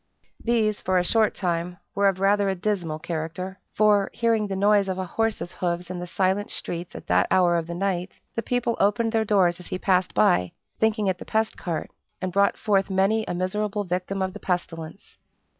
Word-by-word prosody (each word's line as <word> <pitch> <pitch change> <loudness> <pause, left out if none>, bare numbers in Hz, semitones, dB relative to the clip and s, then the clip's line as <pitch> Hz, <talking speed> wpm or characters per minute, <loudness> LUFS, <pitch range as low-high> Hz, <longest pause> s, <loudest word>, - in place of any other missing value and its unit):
These, 220 -3 +1
for 185 0 +1
a 180 - +3
short 220 +4 +2
time, 175 -1 -2 0.2
were 200 0 +3
of 190 -1 +1
rather 200 0 +3
a 190 - 0
dismal 180 -5 -2
character; 170 +4 -5
for, 205 -2 +3
hearing 225 -3 +2
the 195 - -3
noise 200 0 +3
of 190 -1 -2
a 185 - -2
horse's 220 -1 -1
hoofs 175 0 -2
in 180 - -4
the 175 - -5
silent 190 +3 0
streets 175 +1 -5
at - - -8
that - - +3
hour 175 -2 +4
of 165 -1 -1
the 170 - -5
night, 185 -1 -2
the 230 - -1
people 240 -1 0
opened 225 +3 +2
their 225 -1 +2
doors 185 -4 +3
as 180 - -11
he - - -3
passed 185 -1 +1
by, 90 -4 +3 0.3
thinking 220 -1 +2
it 185 -2 0
the - - -6
pest 220 0 0
cart, 170 -4 -4 0.3
and 185 -1 -3
brought 200 0 +3
forth 200 -2 +1
many 195 +3 +2
a - - -2
miserable 205 +3 -1
victim 185 +1 -2
of 190 0 -2
the 210 - -8
pestilence. 165 -4 -4
190 Hz, 205 wpm, -25 LUFS, 180-210 Hz, 0.3 s, hour